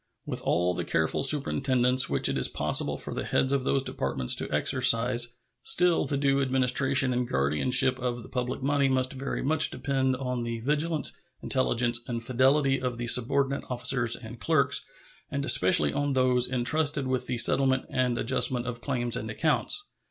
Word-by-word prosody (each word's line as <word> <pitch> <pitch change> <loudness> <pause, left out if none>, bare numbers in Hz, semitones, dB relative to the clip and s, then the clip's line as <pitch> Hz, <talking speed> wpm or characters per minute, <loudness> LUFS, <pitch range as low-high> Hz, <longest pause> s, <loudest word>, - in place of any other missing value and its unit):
With - - -6
all 90 +1 0
the 85 - -4
careful 80 -1 -1
superintendence 130 -3 +2
which - - +2
it - - -1
is - - +2
possible - - 0
for - - -6
the - - -4
heads 135 +1 0
of 135 -2 -1
those 135 0 0
Departments 65 - -1
to - - -3
exercise, 120 +1 +2 0.3
still 175 -1 +3
the 140 - -2
due 140 0 0
administration 130 0 +1
and 125 0 -2
guardianship 125 - +2
of 120 -2 -4
the - - -12
public 125 +1 -4
money 140 0 +1
must 130 0 -1
very 135 0 -5
much 155 +3 +4
depend 130 -2 -2
on 125 -1 -4
the 115 -1 -5
vigilance, 150 +4 0 0.3
intelligence, 120 -2 0
and 115 -1 -5
fidelity 135 +2 +1
of 125 -2 -4
the 120 - -5
subordinate 135 +3 +2
officers 125 -1 0
and 115 0 -11
clerks, 155 -3 0 0.5
and - - -4
especially 75 -1 +4
on 145 -1 -2
those 125 -1 +1
intrusted 140 +3 +1
with 130 -1 -2
the 125 - -3
settlement 130 +2 +3
and 125 -2 -2
adjustment 125 0 0
of 120 -1 -6
claims 120 -3 -3
and 110 -2 -6
accounts. 160 - -1
130 Hz, 170 wpm, -26 LUFS, 120-135 Hz, 0.5 s, much